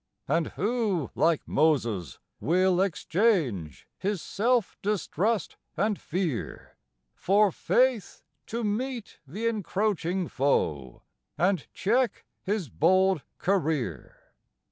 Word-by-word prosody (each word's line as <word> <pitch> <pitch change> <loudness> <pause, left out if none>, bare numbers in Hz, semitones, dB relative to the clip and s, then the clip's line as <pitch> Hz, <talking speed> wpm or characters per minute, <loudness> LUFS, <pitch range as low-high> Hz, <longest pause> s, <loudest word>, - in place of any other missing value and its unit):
And 160 +3 +1
who, 205 - 0
like 165 -2 +1
Moses, 120 - +1 0.2
will 180 - +2
exchange 165 - 0
his 200 0 -1
self 230 +4 0
distrust 210 0 -1 0.2
and 205 +3 0
fear 170 - -3 0.4
For 200 +1 +3
faith 250 +3 +1 0.2
to 230 +1 -3
meet 235 +2 -3
the 205 +12 -5
encroaching 195 -4 0
foe 75 - -1 0.3
and 180 -2 +1
check 235 +3 0 0.2
his 200 -4 -2
bold 185 - +3 0.2
career? 155 - -1
185 Hz, 95 wpm, -27 LUFS, 155-210 Hz, 0.4 s, For